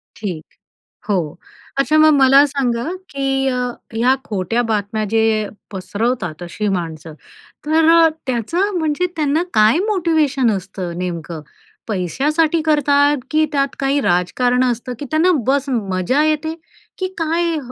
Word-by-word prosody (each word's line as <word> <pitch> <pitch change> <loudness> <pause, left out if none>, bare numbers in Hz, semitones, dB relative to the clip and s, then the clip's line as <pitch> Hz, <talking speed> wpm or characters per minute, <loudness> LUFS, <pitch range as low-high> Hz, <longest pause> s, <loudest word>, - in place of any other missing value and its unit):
ठीक. 180 -7 -5 0.7
हो. 175 -7 -1 0.4
अच्छा 300 +3 +2
मग 310 0 +6
मला 275 0 +6
सांगा, 250 -4 -1 0.3
की 270 -1 -1
अ, 250 -1 -1 0.3
या 250 +3 +3
खोट्या 210 +3 -1
बातम्या 215 -1 -2
जे 220 -1 +2 0.2
पसरवतात, 195 -3 -3
अशी 210 +5 -4
माणसं. 165 -4 -4 0.5
तर 315 +1 +3
अ, 330 -1 +6 0.2
त्याचं, 330 - -1
म्हणजे 315 +2 0
त्यांना 305 +1 +1
काय 215 +7 +4
मोटिवेशन 315 - +1
असतं 185 -3 -5
नेमकं? 170 -3 -5 0.5
पैशासाठी 300 - 0
करतात, 290 -1 +3
की 310 0 +3
त्यात 275 -2 0
काही 275 +1 +1
राजकारण 245 +6 +1
असतं, 245 0 -2
की 290 - -5
त्यांना 325 +4 +3 0.2
बस 280 +1 +1
मजा 215 +3 0
येते, 310 +1 0 0.4
की 370 - -2
काय 330 0 0
255 Hz, 130 wpm, -18 LUFS, 205-305 Hz, 0.7 s, मग